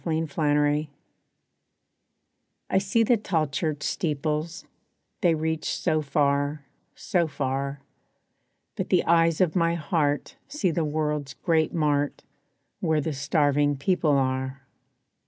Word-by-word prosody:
=Contrasts= 150 -2 +1 1.8
I - - +3
see 200 +4 +2
the 235 +1 +3
tall 175 -7 0
church 150 +1 -3
steeples, 155 0 -2 0.6
They 175 -5 +4
reach 160 0 -2
so 155 -3 +1
far, 145 0 0 0.3
so 175 -3 0
far, 140 -1 -3 0.9
But - - -3
the - - +3
eyes 165 0 +3
of 180 -2 +2
my 170 -1 +2
heart 150 -3 -1
see 235 - 0
the 165 +1 0
world's 150 -2 -2
great 160 +4 +1
mart, 145 -3 0 0.6
Where 160 -1 +1
the 155 +1 -2
starving 145 0 +1
people 150 -1 +2
are. 130 0 -2
150 Hz, 115 wpm, -26 LUFS, 145-165 Hz, 1.8 s, They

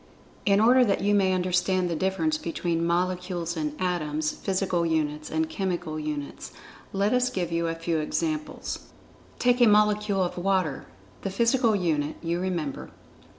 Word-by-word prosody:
In 200 0 +5
order 250 +4 +6
that 200 -5 +1
you 205 +1 +2
may 195 -2 +3
understand 185 0 +1
the 170 - -2
difference 165 -3 0
between 165 0 -2
Molecules 180 -1 -1
and 150 -2 -3
Atoms—physical 175 +2 -1
units, 155 -2 -1
and 320 0 0
chemical 180 - -3
units, 150 -2 -5 0.4
let 200 +3 +1
us 250 0 +3
give 175 -3 -3
you 170 0 0
a 165 - -2
few 165 -1 -1
examples. 305 - -2 0.6
Take 245 0 +2
a 240 - +8
molecule 210 -2 +3
of 175 0 -3
water—the 155 - -2
physical 230 +3 +2
unit, 155 -5 0
you 170 +1 -1
remember. 175 -6 -3
180 Hz, 145 wpm, -26 LUFS, 165-200 Hz, 0.6 s, a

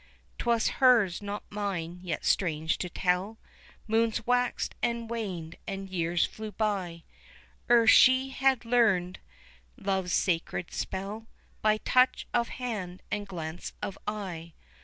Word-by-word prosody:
'Twas 235 -1 +2
her's, 230 -9 +5
not 205 0 -5
mine 185 -4 -3
yet 175 -4 -4
strange 160 -3 +1
to 180 - -3
tell 185 +5 0 0.5
Moons 225 0 +1
waxed 245 0 +1
and 235 -1 -1
waned 185 -8 -4
and 195 -1 -5
years 170 -1 +1
flew 215 -1 -7
by, 190 -6 -2 0.7
Ere 235 -1 +6
she 260 +3 +6
had 265 -2 +1
learned 210 -7 +2 0.6
love's 190 -2 -1
sacred 175 -1 0
spell 205 +4 -4 0.3
By 215 0 +3
touch 255 +3 +3
of 235 -1 +2
hand 205 -8 -5
and 205 0 -2
glance 165 -2 -6
of 195 -2 -3
eye. 180 -6 -5
205 Hz, 125 wpm, -29 LUFS, 180-230 Hz, 0.7 s, Ere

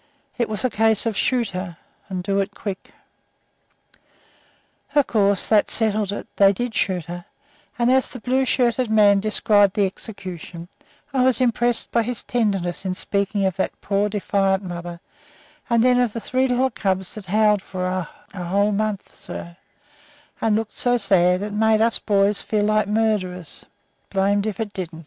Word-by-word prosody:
It 235 -2 -1
was 215 +2 -3
a - - +2
case 220 +1 +2
of 225 -2 -1
"Shoot 240 0 0
her, 180 -2 -6 0.3
and 185 -2 -4
do 195 +1 0
it 195 - -2
quick." 195 -3 -6 2.0
Of 290 -2 +5
course, 200 -3 +1
that 215 -2 +3
settled 215 -2 0
it; 205 - -5
they 195 -1 +6
did 240 +3 -3
shoot 180 -6 -1
her, 175 +1 -7 0.5
and 240 +1 +2
as 260 0 +2
the 250 - -9
blue 255 +4 +1
shirted 245 -1 +1
man 205 -2 +5
described 205 -1 +3
the 205 -2 +3
execution 180 -4 -7 0.4
I 265 - +2
was 260 0 +4
impressed 240 -1 +1
by 235 - +3
his 240 +1 -3
tenderness 195 -8 -1
in 185 -1 -2
speaking 200 +1 0
of 190 0 -1
that 190 - -2
poor, 200 +1 0
defiant 195 -1 0
mother, 175 -1 -7 0.7
and 235 -1 +3
then 250 0 +4
of 245 -4 +1
the 230 - -3
three 260 +3 0
little 255 +1 +1
cubs 190 -4 -2
that 205 -3 -9
"howled 210 +1 +3
for 185 -1 -7
her 185 -3 -3 0.2
a 180 -3 -5
whole 200 +4 +1
month, 210 -1 -3
sir, 170 0 -8 0.9
and 220 -2 +2
looked 220 -1 -2
so 245 0 +1
sad 185 -3 +3
it 210 0 -5
made 220 +1 +3
us 230 +1 +3
boys 200 0 +2
feel 210 -1 -1
like 215 -1 +2
murderers, 205 -6 -1 0.4
blamed 200 +1 +1
if 210 -1 -4
it 215 -2 -4
didn't!" 175 -4 -6
205 Hz, 170 wpm, -22 LUFS, 190-225 Hz, 2.0 s, they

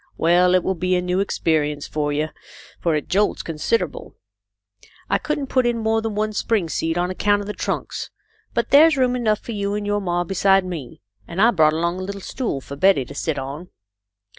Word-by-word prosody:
Well, 180 +2 +4
it 180 - +3
will 190 - 0
be 185 +1 0
a - - +2
new 180 +1 0
experience 150 -6 0
for 150 -1 -2
you, 150 +2 -1 0.5
for 165 -2 +1
it 150 - -2
jolts 205 +3 +1
considerable. 165 +8 -2 1.0
I - - +3
couldn't 300 -2 -2
put 255 -2 +1
in 240 -1 0
more 225 0 +1
than 220 -2 -3
one 215 +1 -1
spring 210 -5 0
seat 165 +1 -1
on 180 +1 0
account 205 +2 +1
of - - -6
the 210 - -4
trunks, - - -4 0.5
but 235 - 0
there's 305 +1 +7
room 250 -1 +2
enough 215 -4 0
for - - -7
you 200 -1 -2
and 210 0 -3
your 205 0 0
ma 175 -2 0
beside 195 +1 +3
me, 160 -9 -7 0.3
and 170 - -6
I 230 +4 +6
brought 155 -6 +4
along 170 +3 -1
a - - -4
little 200 +1 -5
stool 205 - -3
for 140 - -8
Betty 165 -3 +3
to - - -10
sit 160 -3 -2
on." 140 +6 -6
185 Hz, 210 wpm, -22 LUFS, 165-215 Hz, 1.0 s, there's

